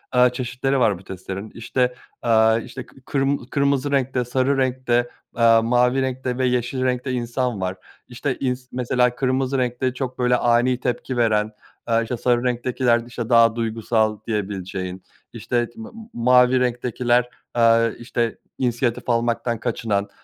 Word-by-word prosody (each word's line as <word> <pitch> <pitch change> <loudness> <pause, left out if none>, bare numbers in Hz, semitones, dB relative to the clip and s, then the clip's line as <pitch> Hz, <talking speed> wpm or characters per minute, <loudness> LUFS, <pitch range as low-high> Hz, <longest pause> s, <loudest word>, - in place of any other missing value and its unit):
eee, 125 0 +6
çeşitleri 125 +2 -1
var 105 -7 +2
bu - - -16
testlerin. 95 +2 -7
İşte, 125 +2 -1 0.3
aaa, 110 -1 +4
işte, - - -8
k - - -22
kırm 140 0 +1
kırmızı 140 +1 0
renkte, 130 -2 0
sarı 130 +3 +1
renkte, 125 -2 +1 0.3
aaa, 115 -1 +5
mavi 125 +3 +2
renkte 130 -1 -2
ve 130 - +1
yeşil 125 +1 -1
renkte 125 +1 -1
insan 120 -3 -2
var. 95 0 -2 0.3
İşte, 125 +2 -3
ins 125 -1 -2
mesela 125 0 +1
kırmızı 130 +1 0
renkte 125 0 -1
çok, 130 -1 -5
böyle, 125 0 +3
ani 120 +1 +2
tepki 125 +1 -3
veren, 110 -2 +2 0.3
aaa, 115 -1 +2
işte, 115 +2 -3
sarı 120 +1 +1
renktekiler, 125 -1 +1
işte, 120 -2 -5
daha 115 -2 +5
duygusal 110 -1 0
diyebileceğin, 95 -3 -4 0.3
işte, 120 -1 -1
t 225 - -16
m - - -7
m 225 -1 -12
mavi 125 +1 +4
renktekiler, 125 0 +1 0.2
aaa, 115 -1 +4
işte, 120 -1 -2 0.2
insiyatif 120 -1 -1
almaktan 120 0 0
kaçınan, 105 -4 -1
125 Hz, 150 wpm, -22 LUFS, 115-130 Hz, 0.3 s, eee